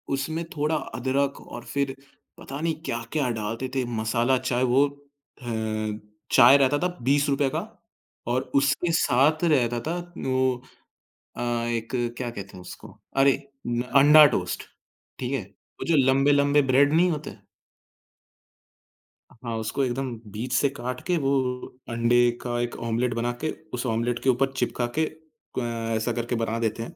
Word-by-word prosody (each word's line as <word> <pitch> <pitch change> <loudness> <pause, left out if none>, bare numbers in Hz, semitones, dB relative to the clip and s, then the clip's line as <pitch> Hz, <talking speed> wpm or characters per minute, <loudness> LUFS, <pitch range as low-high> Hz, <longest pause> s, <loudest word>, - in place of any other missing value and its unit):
उसमें 160 +4 -3
थोड़ा 150 +2 0
अदरक 135 +1 -1
और - - -9
फिर 140 -1 -1 0.4
पता 140 +1 -7
नहीं 165 0 +1
क्या-क्या 120 +4 -2
डालते 115 +4 -3
थे? 130 - +1
मसाला 115 +2 +1
चाय 125 0 -1
वो 140 +2 +5
अ, 140 -2 -18 0.9
चाय 130 +2 +8
रहता 140 +1 +3
था 180 - +1 0.2
₹20 140 +3 +3
रूपए 140 -1 +2
का - - -2 0.7
और 125 +2 +1
उसके 140 +5 +2
साथ 155 +2 +3
रहता 125 -8 +2
था 165 - -1 0.3
वो 130 -1 +1 0.8
अ, - - -4
एक 120 -1 -1 0.3
क्या 125 -2 -3
कहते 100 -4 -9
हैं - - -10
उसको? - - -11 0.2
अरे 135 0 +5 0.3
न 120 0 0 0.2
अंडा 150 +2 +9
टोस्ट, 90 -1 -2 0.6
ठीक 130 +1 -3
है? 135 - 0 0.4
वो - - -4
जो 165 - +3
लंबे-लंबे 140 +2 +4
ब्रेड 140 +3 +4
नहीं 175 +3 +4
होते 155 -1 -5 2.0
हाँ, 115 -1 -6
उसको 110 +5 -1
एकदम 130 +1 -2 0.2
बीच 115 +5 -4
से 140 - +3
काट 125 -2 -5
के 180 -1 +2
वो 135 - +2 0.6
अंडे 120 +1 +3
का 120 -1 -2
1 120 0 -2
ऑमलेट 120 +2 0
बनाके, 120 +6 -2 0.2
उस 125 +1 -3
ऑमलेट 120 0 0
के 135 - +3
ऊपर 135 +2 +2
चिपका 120 -1 -1
के 160 - +3
अ, 125 -8 -6
ऐसा 110 +2 0
करके 120 +1 -2
बना 115 0 -1
देते 115 0 -1
हैं। - - -10
130 Hz, 155 wpm, -25 LUFS, 120-140 Hz, 2.0 s, अंडा